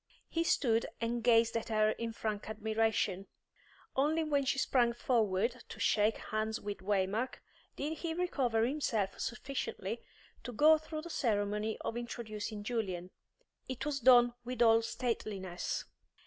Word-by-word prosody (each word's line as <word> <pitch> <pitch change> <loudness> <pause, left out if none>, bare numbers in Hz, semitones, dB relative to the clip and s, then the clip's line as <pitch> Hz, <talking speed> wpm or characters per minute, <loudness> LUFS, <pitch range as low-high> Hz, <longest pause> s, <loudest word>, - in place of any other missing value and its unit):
He 330 - 0
stood 230 -8 +2
and 235 0 -1
gazed 230 -1 +4
at 230 - -2
her 215 -1 +3
in 230 +1 -3
frank 215 -2 -4
admiration; 220 -3 0 0.7
only 305 +4 +2
when 285 -3 +1
she 275 - +1
sprang 245 -3 +3
forward 230 0 +1
to - - -9
shake 215 +1 +3
hands 215 0 -2
with 205 0 -5
Waymark 200 +5 0 0.4
did 300 +2 -3
he 325 -2 -3
recover 255 -11 +1
himself 240 -7 -1
sufficiently 235 -4 -4 0.4
to 245 - -6
go 310 +7 +6
through 310 0 -6
the 340 - -7
ceremony 210 -4 0
of - - -3
introducing 215 -3 -5
Julian. 190 -6 -3 0.6
It 260 +2 -4
was 295 -2 -1
done 245 -1 +6
with 245 0 0
all 225 0 +6
stateliness. 210 -6 -3
230 Hz, 140 wpm, -33 LUFS, 215-255 Hz, 0.7 s, go